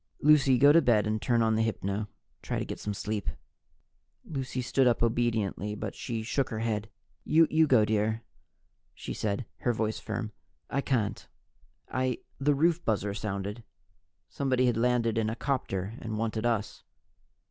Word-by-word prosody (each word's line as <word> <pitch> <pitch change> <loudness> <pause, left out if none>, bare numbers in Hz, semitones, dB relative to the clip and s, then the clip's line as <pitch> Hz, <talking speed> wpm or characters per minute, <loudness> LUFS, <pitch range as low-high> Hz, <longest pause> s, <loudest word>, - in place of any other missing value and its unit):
"Lucy, 140 -3 +5
go 140 +3 +7
to 165 +2 +6
bed 115 -7 +3
and 110 0 -1
turn 120 -2 +2
on 110 0 +2
the 110 - +2
hypno 100 -3 -1
and 105 +1 -3 0.3
try - - -3
to - - -2
get - - -6
some 105 - -3
sleep." 105 0 -3 1.0
Lucy 135 -4 -4
stood 130 +1 +2
up 120 -1 +2
obediently, 110 -3 0
but 105 -1 -5
she 115 -3 -4
shook 130 +4 0
her 110 - -4
head. 110 -1 -2 0.3
"You 160 0 +4
go, 120 -6 +5
dear," 110 +1 0 0.7
she - - -6
said, 105 +3 -2
her 120 - 0
voice 110 -1 -1
firm. 110 0 -4 0.4
"I 140 - +1
can't. 115 -5 -1 0.6
I 130 -1 -1
" - - -39
The 145 - +5
roof 170 +4 +2
buzzer 105 -2 0
sounded. 100 +1 -4 0.7
Somebody 130 -2 +1
had 120 -2 +2
landed 115 -1 +2
in 110 -1 0
a 110 - -3
copter 110 -8 -2
and 110 -1 -4
wanted 110 +1 -1
us. 110 -3 -2
115 Hz, 170 wpm, -29 LUFS, 105-130 Hz, 1.0 s, go